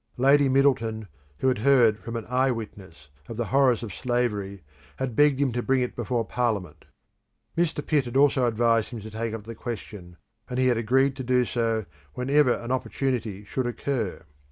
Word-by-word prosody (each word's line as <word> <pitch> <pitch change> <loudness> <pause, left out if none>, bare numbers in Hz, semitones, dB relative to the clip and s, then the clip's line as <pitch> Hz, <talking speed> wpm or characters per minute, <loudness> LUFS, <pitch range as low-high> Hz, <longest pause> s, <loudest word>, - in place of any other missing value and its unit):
Lady 140 +2 +4
Middleton, 115 -6 +1 0.3
who - - +2
had 130 -4 +2
heard 120 -4 +4
from 115 - -7
an 115 - -4
eye 130 +2 +2
witness 95 - -7 0.2
of 115 - -6
the 120 - -1
horrors 130 -4 +4
of 105 -6 -6
slavery, 105 -5 -2 0.3
had 130 -3 -4
begged 145 -1 +4
him 140 -3 +2
to 120 +1 -2
bring 130 +1 +1
it 125 - -3
before 120 0 -1
parliament. 105 -10 -2 0.7
Mr. 165 -3 0
Pitt 145 -4 +1
had 120 +2 -2
also 135 -3 +4
advised 115 -1 +2
him 120 - -7
to 110 +1 -9
take 110 +1 -3
up 110 - -8
the 115 +2 -8
question, 105 -6 -8 0.3
and 125 - -4
he 130 - +2
had 120 - +2
agreed 130 +4 +2
to 130 - -4
do 125 0 +2
so 115 -3 -1 0.3
whenever 135 +1 +3
an 120 +1 -5
opportunity 125 -6 -2
should 125 +4 -3
occur. 120 - -3
120 Hz, 185 wpm, -26 LUFS, 110-130 Hz, 0.7 s, Lady